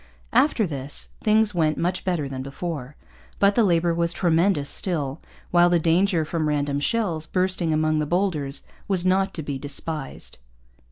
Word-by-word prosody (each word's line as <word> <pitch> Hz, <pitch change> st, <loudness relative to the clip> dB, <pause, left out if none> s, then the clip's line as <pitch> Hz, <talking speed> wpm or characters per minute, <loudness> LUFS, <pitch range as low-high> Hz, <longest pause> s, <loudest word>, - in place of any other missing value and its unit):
After 255 Hz, -2 st, +3 dB
this, 140 Hz, -4 st, -3 dB
things 215 Hz, 0 st, +4 dB
went 155 Hz, -3 st, +1 dB
much 180 Hz, +2 st, -1 dB
better 175 Hz, -6 st, -1 dB
than 135 Hz, -1 st, -5 dB
before. 140 Hz, 0 st, -5 dB, 0.4 s
But 200 Hz, 0 st, +4 dB
the 235 Hz, -, +3 dB
labour 170 Hz, -3 st, +2 dB
was 170 Hz, 0 st, +1 dB
tremendous 170 Hz, -3 st, +2 dB
still; 150 Hz, -6 st, -2 dB, 0.3 s
while 175 Hz, 0 st, +5 dB
the 175 Hz, -, +4 dB
danger 170 Hz, +1 st, +2 dB
from 155 Hz, 0 st, -1 dB
random 145 Hz, -1 st, 0 dB
shells 165 Hz, -3 st, 0 dB
bursting 185 Hz, -3 st, +1 dB
among 155 Hz, 0 st, +1 dB
the 150 Hz, -, -1 dB
boulders 160 Hz, -6 st, -1 dB, 0.2 s
was 185 Hz, -3 st, 0 dB
not 190 Hz, +1 st, +2 dB
to 160 Hz, -, -4 dB
be 140 Hz, -2 st, -4 dB
despised. 145 Hz, +1 st, -5 dB
165 Hz, 160 wpm, -24 LUFS, 150-185 Hz, 0.4 s, while